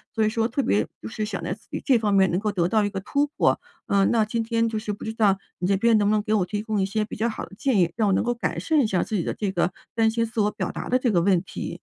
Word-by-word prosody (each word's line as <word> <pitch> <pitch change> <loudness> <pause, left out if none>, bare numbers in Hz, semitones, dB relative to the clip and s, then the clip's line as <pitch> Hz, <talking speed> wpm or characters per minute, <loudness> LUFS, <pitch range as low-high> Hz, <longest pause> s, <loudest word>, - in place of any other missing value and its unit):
所 220 - +2
以 215 - +3
说 225 0 0
特 260 +3 -1
别 105 - +1
就 110 - -6
是 215 - -3
想 200 -3 -5
在 - - -2
自 220 - -15
己 - - -4
这 260 -3 +5
方 210 -2 0
面 190 -2 +4
能 175 - +1
够 210 0 -1
得 180 -3 0
到 215 -2 +2
一 - - 0
个 195 -1 -5
突 285 +7 0
破， 290 - +1 0.3
嗯。 195 -1 +3
那 225 -2 +3
今 225 +2 -2
天 230 0 0
就 220 -1 -2
是 210 -1 -4
不 - - -9
知 220 - -3
道， 205 -4 +3 0.2
你 180 - -1
这 200 - +3
边 225 +2 +4
能 205 -1 +2
不 215 - +3
能 210 - 0
给 215 - -1
我 185 -4 +2
提 205 +2 -3
供 215 -2 -1
一 - - +2
些 215 +2 -1
比 210 - -7
较 230 - +1
好 225 - -4
的 - - -17
建 265 -7 +1
议， 170 -1 +3
让 215 -2 +2
我 195 - +3
能 - - +2
够 240 - 0
改 240 - -3
善 315 -2 +1
一 240 - +3
下 185 -4 +1
自 215 - -2
己 170 - -1
的 - - -2
这 200 -3 -2
个 180 0 0 0.2
担 225 -1 +3
心 230 +1 0
自 225 0 -5
我 210 0 +3
表 - - -3
达 - - -6
的 255 - +3
这 250 -2 +1
个 175 - +3
问 180 0 +2
题。 - - -6
215 Hz, 365 characters per minute, -24 LUFS, 195-230 Hz, 0.3 s, 这